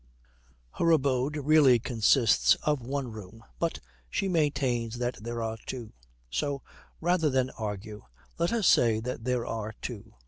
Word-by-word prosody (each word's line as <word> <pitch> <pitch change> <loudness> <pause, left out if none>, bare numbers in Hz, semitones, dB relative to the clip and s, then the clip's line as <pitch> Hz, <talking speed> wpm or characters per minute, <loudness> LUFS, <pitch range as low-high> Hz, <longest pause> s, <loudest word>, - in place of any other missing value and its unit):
Her 170 - +3
abode 140 -2 +2
really 145 -3 +5
consists 115 0 +3
of 150 -3 +1
one 130 0 -3
room, 110 +1 -11 0.2
but 170 -1 0 0.3
she 195 - -1
maintains 140 -9 0
that 120 -2 -3
there 120 0 -3
are 110 0 -4
two; 120 -4 -6 0.3
so, 135 - -2 0.4
rather 170 -2 +2
than 130 -1 +1
argue, 105 -1 -6 0.3
let 170 +1 +1
us 230 -4 0
say 115 -7 +4
that 120 0 -5
there 125 -2 0
are 110 -1 -4
two. 110 -2 -7
125 Hz, 145 wpm, -28 LUFS, 115-145 Hz, 0.4 s, really